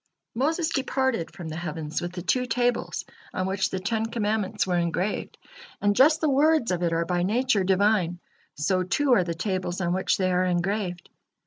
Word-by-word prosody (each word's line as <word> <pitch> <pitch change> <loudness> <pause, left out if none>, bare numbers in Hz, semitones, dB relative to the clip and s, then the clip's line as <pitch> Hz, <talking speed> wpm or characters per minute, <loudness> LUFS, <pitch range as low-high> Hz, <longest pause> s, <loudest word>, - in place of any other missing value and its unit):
Moses 315 +7 0
departed 265 - 0
from 175 -4 -8
the 155 - -5
heavens 160 -2 -4
with 175 +1 -5
the 180 -2 -6
two 250 +7 +1
tables 245 0 0 0.3
on 185 - 0
which 190 0 0
the 190 - -3
Ten 220 +4 -1
Commandments 215 -2 -1
were 180 -2 0
engraved, 175 +4 -2 0.4
and 205 0 +2
just 305 +6 +5
the 315 - +2
words 290 -3 +3
of 180 -1 -1
it 170 -1 +1
are 165 0 0
by 175 +1 0
nature 215 +2 +2
Divine, 190 -2 +2 0.4
so 185 +6 +1
too 255 +9 +2
are 185 - +4
the 170 -1 -3
tables 185 0 -2
on 175 -2 0
which 190 +1 +1
they 185 -1 +1
are 180 0 +2
engraved. 180 0 -1
190 Hz, 190 wpm, -26 LUFS, 175-235 Hz, 0.4 s, just